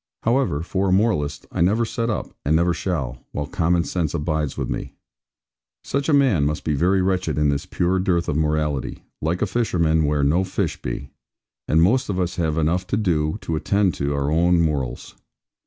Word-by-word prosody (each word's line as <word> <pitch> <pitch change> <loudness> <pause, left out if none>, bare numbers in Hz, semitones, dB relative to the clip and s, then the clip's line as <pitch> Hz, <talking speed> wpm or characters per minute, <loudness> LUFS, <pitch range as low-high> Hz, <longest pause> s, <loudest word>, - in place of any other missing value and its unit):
However, 115 - +1
for 95 +2 -1
a - - +1
moralist, 95 - +1
I - - -2
never 105 +7 +3
set 115 0 -2
up, 110 - -3
and 75 +3 +2
never 85 +2 +3
shall, 65 -10 -3
while 75 - -2
common 85 0 +1
sense 85 -3 -2
abides 75 -2 -1
with - - -2
me. - - -5 0.9
Such 140 +2 -2
a - - +4
man 135 - +4
must 75 +1 -1
be 75 - 0
very 90 +6 +2
wretched 90 -5 0
in 75 -1 +3
this 70 +5 -2
pure 90 +1 0
dearth 90 -2 +1
of 75 - -1
morality; 75 -3 -1 0.2
like 85 +5 0
a - - +3
fisherman 85 -7 +1
where 75 -1 +1
no 80 +7 +3
fish 95 - -2
be; 65 +3 -5 0.6
and 80 +1 +4
most 125 +8 +2
of 95 -2 -1
us 90 0 -2
have 80 -3 0
enough 85 +4 0
to 100 - 0
do 80 -7 0
to 80 - -2
attend 95 +4 +1
to 70 +1 -2
our 70 +1 0
own 85 +2 +3
morals. 75 -7 -2
85 Hz, 195 wpm, -22 LUFS, 75-95 Hz, 0.9 s, a